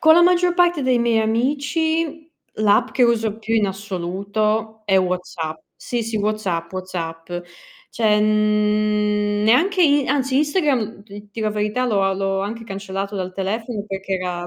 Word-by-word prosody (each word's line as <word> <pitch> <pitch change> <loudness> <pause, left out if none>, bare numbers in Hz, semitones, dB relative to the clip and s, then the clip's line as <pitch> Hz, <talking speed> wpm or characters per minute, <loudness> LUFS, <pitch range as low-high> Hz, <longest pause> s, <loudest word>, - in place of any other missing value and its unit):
con 315 0 +7
la 345 - +6
maggior 355 0 +3
parte 350 -3 +3
dei 255 -1 +2
miei 235 -1 +2
amici 300 +7 0 0.3
l'app 215 +3 +2
che 255 - +1
uso 225 -3 +2
più 225 0 -2
in 215 -2 +3
assoluto 205 +3 -2
è 195 -2 +3
WhatsApp. 180 -3 -2 0.2
Sì, 240 -1 -3
sì, 225 0 -3
WhatsApp, 200 -5 -2
WhatsApp. 170 -3 -6 0.6
Cioè, 215 -2 +2
mhmm, 210 -1 +1
neanche 355 - +4
i 290 -4 +4
anzi 270 -1 +1
Instagram, 285 - 0
d 205 0 -12
dir 220 +2 -5
la 215 - +1
verità, 210 +4 -1
l'ho 205 -5 +1
a 195 0 +2
l'ho 195 0 -1
anche 225 +4 -5
cancellato 195 -1 -5
dal 185 -1 -3
telefono 210 +3 -3
perché 195 -1 -4
era 180 -1 -3
215 Hz, 160 wpm, -21 LUFS, 195-245 Hz, 0.6 s, con